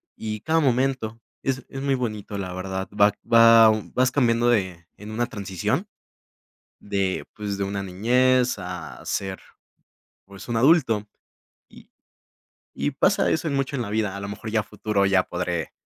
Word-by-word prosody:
y 110 -1 -5
cada 160 +6 +1
momento 130 -4 0 0.2
es 135 -1 -2
es 135 - -7
muy 140 -1 +1
bonito, 110 -4 -4
la 95 -2 -4
verdad, 95 +1 -4
va 105 0 +6 0.2
va 115 -1 +8 0.2
vas 130 0 +2
cambiando 120 -3 +2
de 95 -7 0
en 105 +1 -10
una 120 +2 0
transición, 95 -6 -3 0.9
de 100 -2 -2
pues, 105 -1 -4
de 100 - -2
una 100 0 -3
niñez 125 +6 +2
a 90 -4 -7
ser, 95 -1 -3 0.9
pues 100 +4 -12
un 115 - 0
adulto. 120 -6 +3 0.6
Y - - -17 0.8
y 145 - -2
pasa 145 +8 +2
eso 160 - 0
en 140 - -1
mucho 135 +1 -1
en - - -1
la 100 - -6
vida, 105 -2 -1
a - - -6
lo 100 - -5
mejor 105 +2 -6
ya 110 - +2
a - - -10
futuro 105 -1 -1
ya 95 -1 +3
podré 90 -1 -3
110 Hz, 165 wpm, -24 LUFS, 100-125 Hz, 0.9 s, va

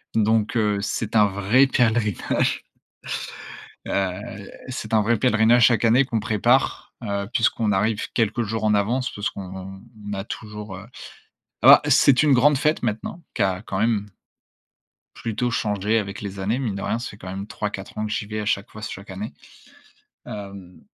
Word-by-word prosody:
donc 110 +1 +2
heu, 105 -2 +2
c'est 110 +2 -1
un 105 - +7
vrai 100 +7 +3
pèlerinage 115 -6 +1 1.2
heu, 100 +1 -3 0.2
c'est 115 -4 -4
un 110 - +4
vrai 115 +1 +2
pèlerinage, 115 -1 +4
chaque 120 -1 +2
année, 120 +4 +5
qu'on 115 -3 -1
prépare, 110 +4 +1
heu, 100 -2 -3
puisqu'on 110 -1 +1
arrive 105 +2 0
quelques 115 +1 +1
jours 110 0 -3
en 105 0 +3
avance. 120 +5 0
Parce 105 - -2
qu'on 95 0 -8 0.3
a 95 0 -4
toujours, 105 -2 -7
heu 100 +3 -10 0.8
ah, - - +9
c'est 135 +1 +5
une 150 -2 +5
grande 140 +3 +5
fête 155 +1 +1
maintenant, 115 +9 -3
qui - - -1
a 95 0 0
quand 95 -3 -4
même 110 -2 +1 1.1
plutôt 120 +2 -2
changé 105 +1 0
avec 100 -2 -4
les 100 -1 -6
années. 105 +6 0
Mine 120 -7 -2
de 100 - -5
rien, 115 - -1
ça 120 - -5
fait - - -12
quand 95 - -10
même 95 +2 -5
3-4 105 -4 -5
ans 110 - -1
que 105 - -5
j'y 105 -1 -2
vais 105 +1 -4
à 105 - -5
chaque 100 -1 0
fois, 110 - -11
chaque 100 -1 -7
année, 100 +3 -6 0.9
hem, 100 -3 -9
105 Hz, 170 wpm, -23 LUFS, 100-115 Hz, 1.2 s, ah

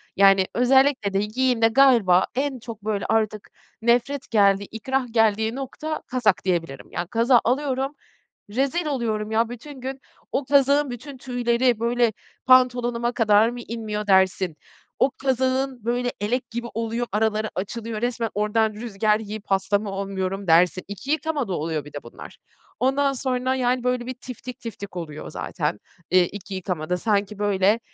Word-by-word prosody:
Yani, 195 -1 +5
özellikle 260 -4 +3
de 195 - +2
giyimde 230 +2 +2
galiba 230 -7 +5
en 270 -1 -1
çok 220 -2 -9
böyle 210 -2 -1
artık 215 -2 0 0.3
nefret 245 +4 +1
geldiği, 200 -2 +4
ikrah 255 +5 -2
geldiği 220 0 +2
nokta 300 +4 -5
kazak 220 -9 +1
diyebilirim. 165 -7 -2
Ya, 175 - -3
kazağı 235 +4 +4
alıyorum, 270 +2 0 0.5
rezil 275 +10 0
oluyorum 220 -7 -2
ya. 225 +1 +2
Bütün 255 +3 -9
gün 265 +1 -5 0.3
o 275 - -1
kazağın 280 +1 +3
bütün 265 +3 -8
tüyleri, 245 -1 +1
böyle, 235 0 +2 0.3
pantolonuma 245 -2 +3
kadar 220 -1 +4
mı 245 0 -7
inmiyor 215 -2 -4
dersin, 190 -3 +3 0.4
o 265 - +3
kazağın 260 -2 0
böyle 245 +1 0
elek 245 +3 -2
gibi 235 +1 -4
oluyor, 230 +1 -2
araları 215 +1 0
açılıyor, 215 +3 -4
resmen 235 -1 -1
oradan 215 +1 +1
rüzgar 215 -1 0
yiyip 215 -1 -7
hasta 195 +1 +1
mı 210 0 -5
olmuyorum 195 0 -3
dersin. 175 +2 +4
2 205 +8 -6
yıkamada 305 -9 -1
oluyor 155 -2 -2
bir 150 - -12
de 145 - -7
bunlar. 120 - -12 0.4
Ondan 275 +3 +2
sonra, 260 0 -1
yani, 250 -1 0
böyle 250 -1 0
bir 255 - -4
tiftik 250 0 -8
tiftik 205 -5 -8
oluyor 155 -3 -6
zaten, 155 0 -3 0.3
eee, 185 0 +6
2 200 +1 -9
yıkamada. 180 -2 -2
Sanki 205 0 0
böyle, 205 +1 +2
230 Hz, 150 wpm, -24 LUFS, 200-255 Hz, 0.5 s, eee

